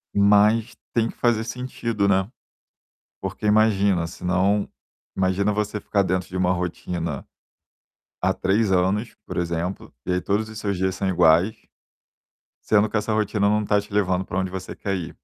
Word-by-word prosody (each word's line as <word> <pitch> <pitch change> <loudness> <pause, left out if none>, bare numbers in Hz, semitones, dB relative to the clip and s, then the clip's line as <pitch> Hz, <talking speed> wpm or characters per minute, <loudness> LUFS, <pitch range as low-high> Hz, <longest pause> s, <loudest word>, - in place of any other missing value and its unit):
mas 105 +3 +4 0.2
tem 115 -1 +1
que - - -9
fazer 115 -2 +2
sentido, 115 -3 -2
né. 95 +1 +2 0.9
Porque 105 - -5
imagina, 100 -5 +3
senão 95 +4 0 0.5
imagina 95 +2 +1
você 105 0 -2
ficar 100 -1 +1
dentro 90 -2 -1
de 95 - -5
uma 90 0 +2
rotina, 85 -3 -4 1.0
há - - +3
3 100 +2 +1
anos, 95 +5 +1
por - - -6
exemplo, 85 +2 -3
e 90 - 0
aí 90 - 0
todos 105 +3 -1
os 110 - -9
seus 100 -3 -2
dias 95 0 0
são 95 0 -2
iguais 90 +3 +4 1.1
sendo 105 0 +4
que 110 - -1
essa 105 +1 -1
rotina 105 -1 +1
não 105 +1 +2
tá 105 0 +2
te 100 0 -9
levando 95 -2 +1
pra 90 - -2
onde 95 -1 -2
você 95 0 -6
quer 100 - -3
ir. 85 -3 -7
100 Hz, 165 wpm, -23 LUFS, 90-105 Hz, 1.1 s, mas